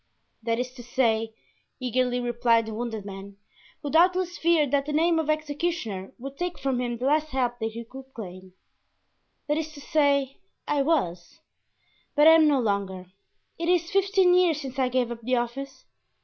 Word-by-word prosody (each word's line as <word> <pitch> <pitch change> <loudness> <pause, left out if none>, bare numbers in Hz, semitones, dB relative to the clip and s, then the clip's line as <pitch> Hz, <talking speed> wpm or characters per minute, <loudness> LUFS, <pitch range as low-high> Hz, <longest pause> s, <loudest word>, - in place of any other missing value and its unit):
"That 230 0 -1
is 250 +1 -3
to 250 -2 -11
say," 225 -3 0 0.4
eagerly 250 0 0
replied 240 -1 +2
the 220 - -6
wounded 225 -2 -4
man, 195 0 -9 0.5
who 290 - -3
doubtless 355 +2 +3
feared 320 -5 +2
that 280 0 +1
the 300 - -2
name 325 +2 +3
of 315 -1 -2
executioner 295 - -2
would 275 +3 -9
take 355 0 -2
from 265 -2 -1
him 240 -1 -2
the 250 - -4
last 305 +2 +2
help 250 -4 -1
that 220 -1 -3
he 230 +1 -7
could 265 +2 -12
claim—"that 185 +8 -9
is 315 0 -4
to 295 - -11
say, 280 -2 +1 0.3
I 290 -1 +1
was, 215 - -1 0.7
but 295 0 +5
am 320 -1 +7
no 285 -2 +3
longer; 195 -5 -2 0.5
it 335 +1 -1
is 345 -1 +2
fifteen 390 -2 +3
years 355 -4 +3
since 270 -1 -6
I 255 -1 +2
gave 250 -1 0
up 235 -1 -6
the 255 +3 0
office. 260 +3 -4
260 Hz, 175 wpm, -26 LUFS, 230-310 Hz, 0.7 s, am